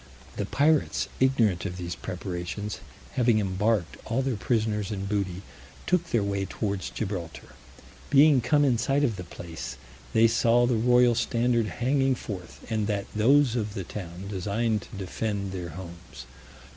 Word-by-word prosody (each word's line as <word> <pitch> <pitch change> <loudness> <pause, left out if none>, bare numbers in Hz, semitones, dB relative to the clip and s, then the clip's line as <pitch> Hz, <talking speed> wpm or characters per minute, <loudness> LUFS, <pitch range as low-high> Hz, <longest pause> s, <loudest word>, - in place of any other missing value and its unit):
The 100 - -2
pirates, 150 +4 +2
ignorant 115 -9 +3
of 90 -3 -4
these 85 -1 -4
preparations, 90 +3 -5 0.3
having 120 -3 +3
embarked 95 -5 0
all 120 +4 0
their 130 -2 0
prisoners 105 -1 0
and 100 -2 -3
booty, 100 -2 -2 0.4
took 180 0 +2
their 115 -4 +2
way 100 -1 -1
towards 100 -1 -3
Gibraltar. 95 -7 -5 0.6
Being 145 -1 +6
come 145 +5 +3
in 125 -4 +2
sight 135 +4 +1
of 120 -7 +1
the 90 - -6
place, 85 -1 -8 0.4
they 115 +1 +6
saw 120 +1 +3
the 125 - +1
royal 120 +1 +5
standard 120 -1 +1
hanging 135 +4 +1
forth, 95 -7 -8
and 110 -2 -1
that 100 -2 -3
those 130 +3 +4
of 105 -3 -2
the 95 - -3
town 90 0 -7
designed 105 +3 -1
to - - -12
defend 100 +1 -3
their 90 -2 -5
homes. 85 -5 -10
105 Hz, 155 wpm, -27 LUFS, 95-120 Hz, 0.6 s, Being